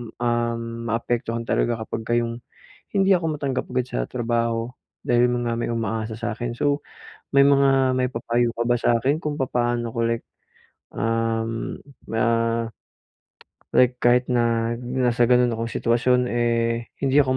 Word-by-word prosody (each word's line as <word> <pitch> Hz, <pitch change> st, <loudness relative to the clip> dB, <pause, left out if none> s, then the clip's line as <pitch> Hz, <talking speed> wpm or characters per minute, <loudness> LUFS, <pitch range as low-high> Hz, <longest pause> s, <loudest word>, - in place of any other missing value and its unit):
um, 120 Hz, -1 st, 0 dB, 0.3 s
maapektuhan 115 Hz, 0 st, -2 dB
talaga 120 Hz, -1 st, +1 dB
kapagka 115 Hz, +1 st, -3 dB
'yong 115 Hz, 0 st, -2 dB, 0.5 s
hindi 195 Hz, 0 st, +4 dB
ako 160 Hz, -3 st, -2 dB
matanggap 135 Hz, -2 st, -1 dB
agad 125 Hz, -1 st, 0 dB
sa -, -, -2 dB
trabaho 115 Hz, -1 st, -1 dB, 0.3 s
dahil 120 Hz, 0 st, +3 dB
yun 120 Hz, -1 st, -1 dB
nga 115 Hz, -, 0 dB
may 120 Hz, -, -2 dB
umaasa 110 Hz, -1 st, -2 dB
sa -, -, -2 dB
akin. 120 Hz, 0 st, -3 dB
So 145 Hz, +1 st, 0 dB, 0.5 s
may 140 Hz, -, +8 dB
mga 135 Hz, -2 st, +4 dB
maipapayo 120 Hz, -1 st, 0 dB
ka 120 Hz, -, 0 dB
ba 120 Hz, -, +3 dB
sa 120 Hz, -, +3 dB
akin 140 Hz, +6 st, +1 dB
kung 150 Hz, -1 st, -2 dB
papaano 120 Hz, -2 st, 0 dB
ko 115 Hz, -, -1 dB
like, 115 Hz, 0 st, -1 dB, 0.7 s
um, 115 Hz, +1 st, -1 dB, 0.3 s
ma 115 Hz, 0 st, 0 dB, 1.5 s
Like 125 Hz, 0 st, +4 dB
kahit 125 Hz, +1 st, +3 dB
na 115 Hz, -1 st, +1 dB
nasa 125 Hz, -1 st, +1 dB
gano'n 125 Hz, -1 st, +4 dB
akong 115 Hz, +1 st, -3 dB
sitwasyon, 120 Hz, +2 st, +2 dB
eh 115 Hz, -1 st, 0 dB, 0.2 s
hindi 135 Hz, +2 st, +4 dB
ako 130 Hz, -1 st, +2 dB
120 Hz, 145 wpm, -23 LUFS, 115-125 Hz, 1.5 s, may